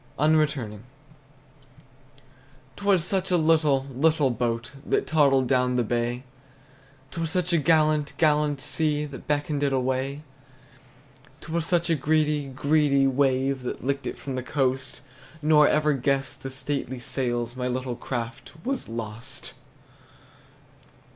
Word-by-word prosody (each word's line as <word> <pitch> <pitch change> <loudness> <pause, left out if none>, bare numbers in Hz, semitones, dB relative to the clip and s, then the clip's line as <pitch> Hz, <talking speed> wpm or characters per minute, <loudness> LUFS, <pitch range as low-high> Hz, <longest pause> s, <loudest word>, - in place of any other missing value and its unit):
UNRETURNING. 145 -8 +1 1.9
'T - - -11
was 190 -5 +3
such 190 0 0
a 180 - +3
little, 155 -4 +3
little 150 0 +2
boat 120 0 -2
That - - 0
toddled 140 -4 +3
down 125 -1 +2
the 125 - +2
bay! 120 +2 -1 0.9
'T 165 - -5
was 165 - -1
such 180 0 -1
a 170 - +4
gallant, 155 -1 +2
gallant 150 -2 +2
sea 150 0 0
That 140 -2 -10
beckoned 145 0 -1
it 140 -1 +1
away! 130 +2 -1 1.2
'T 165 - -9
was 165 0 -1
such 170 -1 +1
a - - +4
greedy, 150 0 +1
greedy 140 0 +2
wave 135 0 +1
That 125 - -5
licked 140 +1 -1
it - - -5
from 135 - -6
the 130 - -2
coast; 130 -1 -1 0.4
Nor 150 -1 +5
ever 150 0 +2
guessed 135 +1 -1
the 135 - -5
stately 130 -1 -3
sails 120 -1 -2
My 125 0 -2
little 125 0 -2
craft 120 -1 -5
was 265 - -2
lost! 115 +2 -6
140 Hz, 135 wpm, -25 LUFS, 130-155 Hz, 1.9 s, Nor